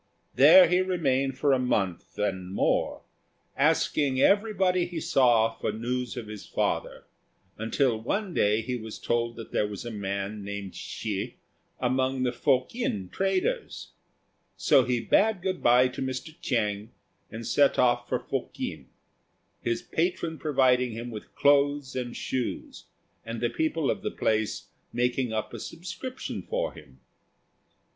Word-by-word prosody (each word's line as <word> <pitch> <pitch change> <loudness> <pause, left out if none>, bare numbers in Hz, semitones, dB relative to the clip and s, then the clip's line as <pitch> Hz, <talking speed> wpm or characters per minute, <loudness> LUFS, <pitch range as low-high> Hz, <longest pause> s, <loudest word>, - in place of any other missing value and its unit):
There 280 -1 +8
he 180 - +3
remained 135 -8 0
for 140 0 +3
a 130 - +3
month 100 -8 -1
and 95 -3 -2
more, 100 - 0 0.5
asking 135 -3 +2
everybody 190 -2 +3
he 175 -2 -5
saw 120 -6 +3
for - - -3
news 125 +3 -3
of 120 - -4
his 105 -1 -8
father, - - -2 0.6
until 115 +1 +1
one 195 - -2
day 105 -2 +2
he 125 +1 -3
was 110 -2 -7
told 120 0 -1
that 115 - -9
there 105 - +1
was 105 +1 -7
a 120 - -4
man 100 0 -4
named 100 -1 -6
Hsi - - -4 0.4
among 130 +1 0
the 125 - +1
Fokien 130 - 0
traders. 195 - -1 0.7
So 130 - +4
he 125 -1 +1
bade 200 - +2
good 185 -1 -2
by 125 +1 +5
to 125 - -7
Mr. 130 +3 -4
Chiang, 105 -4 -1 0.4
and 115 +1 -7
set 140 +3 +3
off 120 -1 +2
for - - +1
Fokien, - - -5 0.7
his 115 -1 -1
patron 170 -1 -1
providing 130 -5 +2
him 120 +2 -6
with 105 -2 -9
clothes 145 -1 +3
and 125 -2 -4
shoes, 130 -2 -4 0.4
and 115 0 -5
the 120 0 0
people 160 +3 0
of - - -4
the - - -2
place 110 -1 -1 0.3
making 125 0 0
up 110 -1 -3
a - - -6
subscription 185 +10 -6
for - - -2
him. - - -15
125 Hz, 145 wpm, -27 LUFS, 115-155 Hz, 0.7 s, There